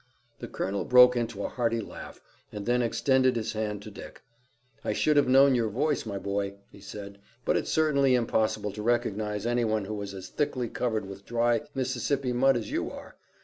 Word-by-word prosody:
The -, -, -6 dB
colonel 100 Hz, +1 st, -3 dB
broke 125 Hz, 0 st, +7 dB
into 115 Hz, -4 st, -2 dB
a -, -, -1 dB
hearty 115 Hz, -2 st, -1 dB
laugh, 110 Hz, -, -9 dB, 0.3 s
and 105 Hz, -1 st, -6 dB
then 125 Hz, +1 st, +2 dB
extended 130 Hz, +2 st, +2 dB
his 115 Hz, -1 st, -2 dB
hand 105 Hz, -2 st, -3 dB
to 110 Hz, -, -9 dB
Dick. -, -, -11 dB, 0.6 s
"I -, -, -1 dB
should 150 Hz, -, +2 dB
have 145 Hz, -2 st, +4 dB
known 135 Hz, +1 st, +6 dB
your 115 Hz, -3 st, +1 dB
voice, 140 Hz, +3 st, -1 dB
my 100 Hz, -2 st, -3 dB
boy," 100 Hz, 0 st, -3 dB, 0.2 s
he -, -, -15 dB
said, 100 Hz, 0 st, -9 dB, 0.3 s
"but -, -, +2 dB
it's -, -, -1 dB
certainly 140 Hz, -4 st, +3 dB
impossible 110 Hz, -3 st, 0 dB
to 105 Hz, +2 st, -7 dB
recognize 110 Hz, -2 st, -1 dB
any 120 Hz, 0 st, +1 dB
one 110 Hz, -2 st, 0 dB
who 105 Hz, 0 st, -5 dB
is 100 Hz, -1 st, -6 dB
as 95 Hz, -, -8 dB
thickly 130 Hz, -5 st, -2 dB
covered 110 Hz, -4 st, -2 dB
with 100 Hz, 0 st, -10 dB
dry 120 Hz, 0 st, +1 dB
Mississippi 130 Hz, 0 st, -1 dB
mud 135 Hz, +1 st, +3 dB
as 115 Hz, -, -5 dB
you -, -, -1 dB
are. -, -, -11 dB
115 Hz, 195 wpm, -28 LUFS, 105-125 Hz, 0.6 s, broke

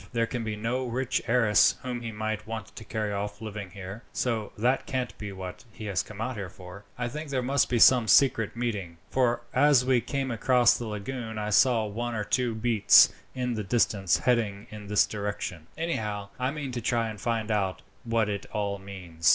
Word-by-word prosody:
There 115 Hz, -1 st, +2 dB
can 115 Hz, 0 st, -4 dB
be 110 Hz, -1 st, -3 dB
no 125 Hz, +4 st, -2 dB
rich 125 Hz, +1 st, -1 dB
heiress 115 Hz, -3 st, +4 dB
whom 125 Hz, -2 st, -4 dB
he 115 Hz, -1 st, -5 dB
might 110 Hz, 0 st, -3 dB
want 110 Hz, -3 st, -6 dB
to -, -, -8 dB
carry 105 Hz, -1 st, -3 dB
off 100 Hz, +1 st, -4 dB
living 105 Hz, -3 st, -6 dB
here, 95 Hz, +3 st, -8 dB
so 115 Hz, -4 st, -2 dB
that 125 Hz, +5 st, +1 dB
can't 130 Hz, -2 st, -2 dB
be 105 Hz, -1 st, -5 dB
what 95 Hz, -2 st, -8 dB
he 110 Hz, -, -9 dB
has 100 Hz, -3 st, 0 dB
come 110 Hz, -, -11 dB, 0.3 s
for. 90 Hz, +2 st, -12 dB
I 120 Hz, -1 st, -2 dB
think 150 Hz, +5 st, -6 dB
there 130 Hz, -2 st, -1 dB
must 135 Hz, +2 st, +2 dB
be 125 Hz, -, +1 dB
some 120 Hz, 0 st, +6 dB
secret 115 Hz, -4 st, +4 dB
meeting, 105 Hz, -8 st, -3 dB
for 125 Hz, -2 st, +1 dB
as 145 Hz, -4 st, +5 dB
we 130 Hz, -2 st, +3 dB
came 135 Hz, -1 st, -2 dB
across 120 Hz, +1 st, +4 dB
the 120 Hz, -, -4 dB
lagoon 110 Hz, +2 st, -5 dB
I 105 Hz, 0 st, -2 dB
saw 115 Hz, 0 st, +4 dB
one 115 Hz, +3 st, -3 dB
or 105 Hz, -, -1 dB
two 120 Hz, +1 st, 0 dB
beats 110 Hz, -2 st, +6 dB, 0.3 s
in 125 Hz, -1 st, -1 dB
the 110 Hz, -2 st, -3 dB
distance 100 Hz, -3 st, +2 dB
heading 110 Hz, -5 st, 0 dB
in 105 Hz, -1 st, -9 dB
this 105 Hz, 0 st, +4 dB
direction. 100 Hz, -6 st, -5 dB
Anyhow, 105 Hz, -11 st, -3 dB
I 130 Hz, +1 st, +1 dB
mean 145 Hz, -2 st, -4 dB
to 120 Hz, -1 st, -4 dB
try 115 Hz, 0 st, +1 dB
and 105 Hz, -2 st, -7 dB
find 115 Hz, -2 st, -1 dB
out 95 Hz, -3 st, -1 dB, 0.2 s
what 115 Hz, -2 st, +1 dB
it 100 Hz, -1 st, -4 dB
all 100 Hz, -1 st, -2 dB
means." 90 Hz, -5 st, -2 dB
110 Hz, 200 wpm, -27 LUFS, 105-125 Hz, 0.3 s, some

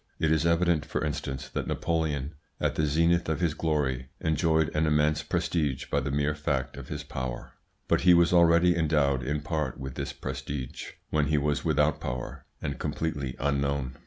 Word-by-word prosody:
It 80 Hz, -, +2 dB
is 80 Hz, +1 st, +3 dB
evident, 85 Hz, -2 st, +2 dB
for -, -, -2 dB
instance, 65 Hz, -3 st, -4 dB
that -, -, -3 dB
Napoleon 80 Hz, -4 st, -1 dB, 0.3 s
at -, -, +1 dB
the 75 Hz, -, +1 dB
zenith 85 Hz, +3 st, +2 dB
of 80 Hz, -, 0 dB
his 85 Hz, -4 st, +1 dB
glory 70 Hz, -6 st, -1 dB
enjoyed 80 Hz, 0 st, +1 dB
an 75 Hz, +1 st, +2 dB
immense 75 Hz, 0 st, +2 dB
prestige 75 Hz, -6 st, -1 dB
by 70 Hz, -, +3 dB
the 70 Hz, +1 st, -3 dB
mere 70 Hz, +2 st, +1 dB
fact 75 Hz, -3 st, -2 dB
of -, -, -9 dB
his 75 Hz, 0 st, -5 dB
power, 65 Hz, -4 st, -5 dB, 0.3 s
but -, -, +2 dB
he 90 Hz, -1 st, +7 dB
was 85 Hz, +1 st, +4 dB
already 85 Hz, 0 st, +5 dB
endowed 75 Hz, -5 st, +2 dB
in 75 Hz, +4 st, -2 dB
part 75 Hz, -3 st, -2 dB
with 65 Hz, -1 st, -5 dB
this -, -, -4 dB
prestige 65 Hz, -4 st, -6 dB, 0.2 s
when 75 Hz, -2 st, +2 dB
he 75 Hz, 0 st, +2 dB
was 75 Hz, -1 st, 0 dB
without -, -, +2 dB
power 60 Hz, 0 st, -5 dB, 0.2 s
and 70 Hz, -2 st, -3 dB
completely 70 Hz, -5 st, -2 dB
unknown. 70 Hz, -2 st, -1 dB
75 Hz, 180 wpm, -28 LUFS, 70-80 Hz, 0.3 s, he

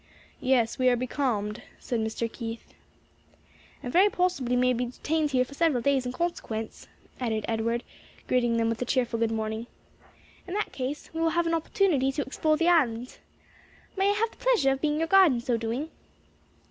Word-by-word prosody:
"Yes, 255 Hz, -3 st, +1 dB
we 255 Hz, 0 st, +4 dB
are 245 Hz, -, +3 dB
becalmed," 240 Hz, -4 st, -2 dB, 0.2 s
said 240 Hz, -, -3 dB
Mr. 220 Hz, +1 st, -2 dB
Keith. 230 Hz, -1 st, -7 dB, 1.1 s
"And 245 Hz, -, -5 dB
very 385 Hz, +4 st, +6 dB
possibly 355 Hz, -11 st, 0 dB
may 250 Hz, 0 st, +3 dB
be 245 Hz, +1 st, -1 dB
detained 300 Hz, +5 st, -1 dB
here 255 Hz, -2 st, +2 dB
for 280 Hz, -, -13 dB
several 285 Hz, -6 st, +1 dB
days 270 Hz, -2 st, +2 dB
in -, -, -2 dB
consequence," 250 Hz, -7 st, -4 dB, 0.3 s
added 220 Hz, -4 st, -1 dB
Edward, 230 Hz, +1 st, -1 dB, 0.4 s
greeting 240 Hz, -2 st, +2 dB
them 230 Hz, 0 st, +2 dB
with 230 Hz, +1 st, -2 dB
a -, -, 0 dB
cheerful 245 Hz, -2 st, 0 dB
good 230 Hz, -1 st, +2 dB
morning. 220 Hz, +1 st, -3 dB, 0.8 s
"In 365 Hz, -, -4 dB
that 420 Hz, -, -1 dB
case 270 Hz, +3 st, -5 dB
we 325 Hz, -, -3 dB
will 330 Hz, -, +3 dB
have 345 Hz, -, +3 dB
an 330 Hz, -, 0 dB
opportunity 325 Hz, -4 st, +1 dB
to 290 Hz, -, -1 dB
explore 310 Hz, +3 st, 0 dB
the 335 Hz, +2 st, +1 dB
island. 255 Hz, -8 st, +2 dB, 0.8 s
May 390 Hz, 0 st, +2 dB
I -, -, +3 dB
have 440 Hz, +2 st, 0 dB
the -, -, -20 dB
pleasure 475 Hz, -, +3 dB
of 270 Hz, 0 st, -2 dB
being 300 Hz, -1 st, +1 dB
your 325 Hz, +1 st, 0 dB
guide 375 Hz, -4 st, +6 dB
in 240 Hz, -, -1 dB
so 235 Hz, 0 st, 0 dB
doing?" 230 Hz, +8 st, -3 dB
255 Hz, 185 wpm, -27 LUFS, 230-320 Hz, 1.1 s, very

